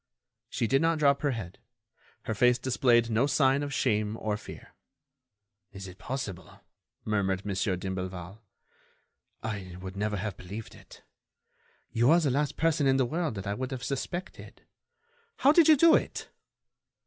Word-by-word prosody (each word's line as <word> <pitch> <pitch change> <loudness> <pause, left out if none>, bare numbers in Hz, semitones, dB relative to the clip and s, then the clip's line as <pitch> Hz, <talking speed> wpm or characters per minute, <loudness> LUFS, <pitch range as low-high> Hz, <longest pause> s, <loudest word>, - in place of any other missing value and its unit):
She - - -1
did 135 +4 +2
not 165 0 +2
drop 140 -2 +3
her 145 - +1
head. 110 -9 -5 0.6
Her - - -2
face 125 +3 +4
displayed 120 -2 +2
no 115 +5 +2
sign 140 -1 +3
of 145 -1 -4
shame 110 -5 0
or 105 -1 -1
fear. 105 - -11 1.0
"Is 95 -1 -8
it 95 +1 -12
possible?" 125 -9 -6 0.5
murmured 95 -2 0
Mon. 100 - -2
d'Imblevalle. 95 0 -3 1.0
"I 100 -5 -5
would 95 0 -8
never 105 +1 -1
have 100 0 -4
believed 100 +5 -8
it.... - - -16 0.9
You 120 +3 +3
are 165 +3 +6
the 150 -5 +1
last 145 +2 -1
person 160 -3 +2
in 135 0 +4
the 130 - +2
world 155 -1 -2
that 95 0 -6
I 100 - -1
would 130 +4 -4
have 130 -2 -6
suspected. 145 +8 -5 0.7
How 275 - +5
did 325 0 +6
you 310 -2 +7
do 330 +3 +6
it?" - - 0
120 Hz, 160 wpm, -28 LUFS, 100-140 Hz, 1.0 s, you